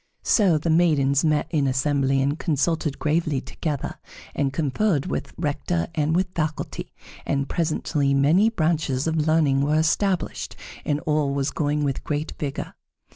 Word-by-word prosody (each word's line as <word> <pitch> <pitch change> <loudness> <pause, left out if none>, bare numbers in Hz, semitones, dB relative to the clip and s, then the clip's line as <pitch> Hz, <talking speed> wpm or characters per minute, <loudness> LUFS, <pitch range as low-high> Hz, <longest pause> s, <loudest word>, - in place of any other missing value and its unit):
So 190 -8 +4
the 160 +2 -1
maidens 150 -4 +3
met 150 -2 +2
in 145 -5 +1
assembly 135 0 +1
and 145 +3 -1
consulted 155 -1 0
gravely 155 -2 0
together, 145 +1 -4 0.3
and 140 -1 0
conferred 150 +2 0
with - - -3
Rector 160 +2 -1
and 155 0 +1
with 185 +1 +1
faculty, 155 -2 -3 0.3
and 140 0 -1
presently 150 -4 0
many 160 +11 +4
branches 155 - 0
of 160 -1 0
learning 150 -4 +3
were 145 +2 +1
established 180 +4 0 0.3
and 145 0 0
all 150 -2 0
was 140 0 0
going 150 -1 0
with 140 -2 -2
great 150 +1 -3
vigor. 140 -2 -4
150 Hz, 145 wpm, -24 LUFS, 140-165 Hz, 0.3 s, So